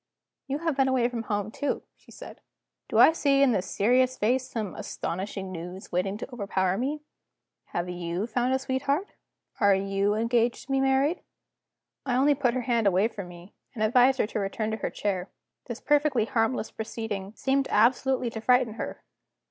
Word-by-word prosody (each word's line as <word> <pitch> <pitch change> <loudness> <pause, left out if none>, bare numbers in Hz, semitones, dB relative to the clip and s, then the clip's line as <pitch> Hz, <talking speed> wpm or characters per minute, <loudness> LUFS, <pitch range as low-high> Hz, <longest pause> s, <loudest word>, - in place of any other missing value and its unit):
"You 275 +1 -1
have 325 -1 -1
been 270 -1 +3
away 255 -2 +2
from 240 -2 -4
home, 205 -1 -2
too," 285 +5 -2
she - - -25
said. - - -11 0.5
"Do - - -1
I - - +8
see 280 -3 +3
in 270 - +4
this 190 -4 -1
serious 250 +4 +2
face 255 +4 +1
some 215 -6 -4
astonishing 190 +1 -5
news 180 +2 -8
waiting 195 +3 -1
to 245 - -8
overpower 190 -4 0
me? 280 +7 -2 0.6
Have 175 +1 -3
you 175 +2 -3
found 245 +2 0
a 265 - +3
sweetheart? 275 +7 -1 0.5
Are 200 -3 +5
you 195 +1 0
engaged 235 +2 +1
to 270 - -8
be 270 - +2
married?" 270 +5 +2 0.8
I 255 -3 -1
only 280 +3 +4
put 260 -3 0
her 255 - 0
hand 235 -3 +1
away 195 +3 +3
from 200 -5 -7
me, 175 +2 -13 0.2
and 215 - -1
advised 250 +4 +4
her - - +2
to 215 - -4
return 215 +2 -2
to 220 - -2
her - - -3
chair. 190 -2 -3 0.4
This 235 0 -5
perfectly 290 -5 +2
harmless 225 -1 0
proceeding 220 -3 -5
seemed 270 0 +1
absolutely 250 +2 +2
to 220 - -6
frighten 250 -2 +3
her. - - -6
230 Hz, 180 wpm, -27 LUFS, 200-265 Hz, 0.8 s, I